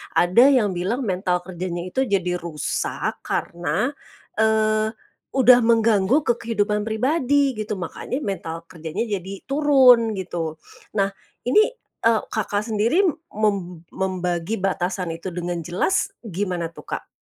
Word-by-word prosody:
Ada 190 +10 +6
yang 240 -8 +4
bilang, 195 +9 -2
mental 180 -3 0
kerjanya 175 -1 -4
itu 260 +8 -1
jadi 180 -3 0
rusak 160 -4 -3
karena, 175 - -1 0.5
eee, 220 0 +2 0.4
udah 250 -1 +7
mengganggu 225 +3 +3
ke 240 - +4
kehidupan 210 -2 0
pribadi 270 +3 +2
gitu, 210 0 -2
makanya 185 +8 -4
mental 165 -4 -4
kerjanya 165 +5 -4
jadi 195 -2 -5
turun, 260 -7 +5
gitu. 165 -4 -4 0.4
Nah, 195 0 +1 0.3
ini, 430 - +5 0.3
eee, 225 -1 +3
Kakak 210 -1 -1
sendiri, 230 - +2 0.3
mem 190 -6 -1
membagi 180 0 -1
batasan 185 -2 -1
itu 170 +3 -6
dengan 175 0 -3
jelas 180 - 0 0.2
gimana 180 -4 -3
tuh, - - -13
Kak? - - -14
200 Hz, 125 wpm, -23 LUFS, 180-230 Hz, 0.5 s, udah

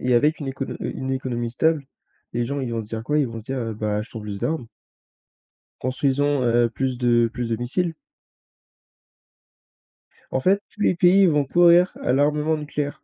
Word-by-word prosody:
et 125 0 +1
avec 150 +6 +3
une 140 - -4
écono 135 0 -4
heu, - - -4
une 130 - -4
économie 120 -3 -2
stable. 155 +3 +1 0.5
Les 120 - 0
gens, 140 +3 -3
ils 125 -3 -3
vont 115 -1 -2
se - - -14
dire 110 -1 -4
quoi? 150 +3 +1
Ils 145 - +2
vont 115 -1 -7
se - - -17
dire, 135 +2 -3
heu,: 115 -2 -3
«Bah 105 0 -2
achetons 110 +1 -5
plus 105 -1 -6
d'armes». 155 -6 -2 1.2
Construisons, 135 +1 +1
heu, 120 0 +3
plus 130 0 -2
de 120 -1 +3
plus 120 -2 -3
de 115 - +1
missiles. 165 +9 -1 2.4
En - - +2
fait, 190 +8 +2
tous - - -23
les 185 - +3
pays 180 +3 +5
vont 150 -3 +3
courir 175 +4 +5
à - - +1
l'armement 150 +3 +2
nucléaire. 145 -1 -4
130 Hz, 190 wpm, -23 LUFS, 120-150 Hz, 2.4 s, pays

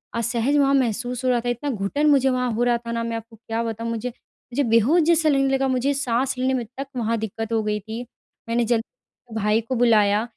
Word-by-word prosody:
असहज 235 +4 +1
वहाँ 275 -1 +3
महसूस 245 -1 0
हो - - +3
रहा 245 -1 +3
था, 245 +1 -3
इतना 245 +4 -2
घुटन 250 +6 0
मुझे 270 -2 +4
वहाँ 250 -1 0
हो 235 +2 0
रहा 240 -1 +3
था 235 0 -7
ना 230 0 -2
मैं 230 0 -2
आपको 225 0 -11
क्या 225 +1 -4
बताऊँ? 230 0 -4
मुझे 230 +2 -3 0.4
मुझे 285 +3 +1
बेहोश 235 +8 +4
जैसा 320 -1 +3
लगने 275 -2 +2
लगा। 270 0 +1
मुझे 260 +2 +1
साँस 265 -1 0
लेने 260 +1 +1
में 250 -2 -1
तक 275 - -3
वहाँ 230 -1 0
दिक्कत 220 +1 -5
हो 225 - +2
गई 210 0 -1
थी। 220 +3 -6 0.5
मैंने 235 +1 +1
जल्दी 230 0 -5
भाई 215 +1 +2
को 230 +3 -4
बुलाया। 215 -3 +4
235 Hz, 225 wpm, -23 LUFS, 225-265 Hz, 0.5 s, मुझे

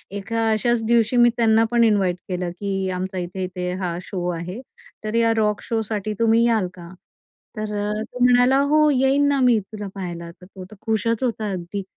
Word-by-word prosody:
एका 225 +3 -1
अशाच 230 +1 +1
दिवशी 235 +1 +2
मी 240 0 +6
त्यांनापण, 225 +1 +3
इन्वाईट 200 -5 +2
केलं 180 -1 -2
की 195 -2 -2
"आमचा 185 +1 -4
इथे-इथे 180 0 -4
हा 175 -2 -2
शो 180 -2 -5
आहे, 175 +5 -5 0.4
तर 215 +1 -3
या 230 0 +3
रॉक 210 -1 +1
शो 225 -1 -1
साठी 215 -1 -3
तुम्ही 230 0 +4
याल 220 -5 +1
का?" 170 -1 -11 0.7
तर 215 - -2 0.4
तो 245 +2 -10
म्हणाला, 250 +1 +5
"हो 300 +2 +4
येईन 275 +1 +3
ना 285 -1 +2
मी 245 -3 +4
तुला 210 +1 -8
पाहायला." 175 -3 -6
तर 180 +1 -17
तो 185 0 -11
तर - - -11
खुशच 225 +1 -1
होता 225 -4 -1
अगदी. 185 +2 -5
215 Hz, 180 wpm, -22 LUFS, 185-235 Hz, 0.7 s, मी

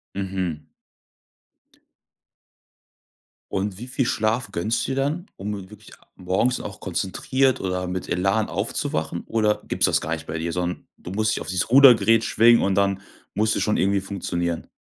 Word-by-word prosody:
Mhm. 95 -6 -3 2.8
Und 95 0 -2
wie 125 - -7
viel 130 0 -1
Schlaf 110 +2 0
gönnst 110 +7 -1
du - - -3
dir 135 - -1
dann, 150 +6 -1
um 100 -1 -5
wirklich 105 - -14 0.2
morgens 95 +7 0
auch 100 - -8
konzentriert 120 +8 0
oder 90 -1 -2
mit 90 0 -4
Elan 95 +4 +1
aufzuwachen? 80 +2 -2
Oder 105 -2 0
gibt's - - +2
das - - +2
gar - - -3
nicht - - -6
bei 80 - -4
dir, 85 +1 -3
so 90 - -1
'n 90 0 -4
du - - -10
musst 110 +2 +1
dich - - -4
auf - - -6
dieses 90 +5 -1
Rudergerät 120 -4 +7
schwingen 115 +1 +5
und 95 -1 +1
dann 100 0 +1 0.3
musst 110 +2 +1
du - - 0
schon 105 - +1
irgendwie 100 0 +2
funktionieren? 85 -3 -3
100 Hz, 165 wpm, -23 LUFS, 90-115 Hz, 2.8 s, Rudergerät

